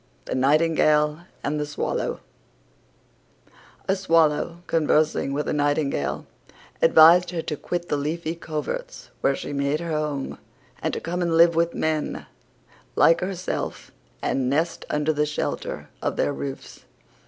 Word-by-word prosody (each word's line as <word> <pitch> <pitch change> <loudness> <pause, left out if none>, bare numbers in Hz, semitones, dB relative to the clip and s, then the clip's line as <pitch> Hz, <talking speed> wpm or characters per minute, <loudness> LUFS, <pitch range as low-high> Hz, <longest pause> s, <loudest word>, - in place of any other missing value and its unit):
THE - - -4
NIGHTINGALE 150 +2 +2 0.2
AND 150 +1 -1
THE 150 - -1
SWALLOW 145 - -2 1.7
A 190 - +3
Swallow, 165 -2 +1
conversing 155 -3 +1
with 145 +2 -2
a - - 0
Nightingale, 145 -1 0 0.6
advised 165 +2 +7
her 170 -2 -3
to 155 - -3
quit 175 +3 -4
the 145 - +1
leafy 160 +3 -2
coverts 170 - -5
where 135 - +2
she 145 - -6
made 140 +2 0
her 170 -1 -4
home, 150 -3 -2 0.4
and - - -1
to - - -2
come 175 +2 -3
and 170 -2 +1
live 170 0 +7
with 170 +1 +1
men, 155 -1 -1 0.7
like 165 0 +5
herself, 185 -1 -4 0.3
and 130 -2 0
nest 160 +5 -1
under 150 +1 +1
the 150 0 +1
shelter 150 - -4
of - - -1
their 145 - 0
roofs. 140 -1 -7
155 Hz, 140 wpm, -24 LUFS, 150-170 Hz, 1.7 s, advised